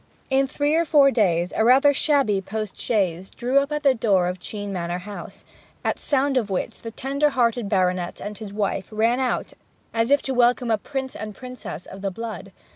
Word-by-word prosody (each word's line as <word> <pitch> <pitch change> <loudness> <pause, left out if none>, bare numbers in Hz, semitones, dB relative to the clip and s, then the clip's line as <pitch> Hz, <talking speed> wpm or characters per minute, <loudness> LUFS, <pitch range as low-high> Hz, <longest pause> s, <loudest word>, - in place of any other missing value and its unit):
In 270 0 +3
three 290 +3 0
or 330 +1 +3
four 290 -4 +5
days 180 -7 +1
a - - +2
rather 270 +5 +6
shabby 275 -9 +2
post 215 +1 -5
chaise 190 -5 0
drew 255 +3 +1
up 280 +1 -2
at 300 0 -2
the 275 -2 +5
door 200 -7 +2
of 180 +1 -3
Chene 205 +2 -6
Manor 175 -1 -2
house, 205 -1 -9 0.4
at - - 0
sound 280 -1 +1
of 225 -5 0
which 190 - -3
the 230 - -6
tender 275 +5 0
hearted 235 -5 +1
baronet 180 -2 0
and 210 +1 -6
his 210 -1 -8
wife 200 -2 -2
ran 225 +3 +1
out 255 -2 -1 0.4
as 230 +1 +1
if 285 0 +4
to 270 - -1
welcome 245 -1 +3
a 220 - +2
prince 265 +2 -5
and 215 -1 -6
princess 250 - -8
of 195 - -10
the 195 - -1
blood. 215 0 -7
225 Hz, 200 wpm, -23 LUFS, 195-265 Hz, 0.4 s, rather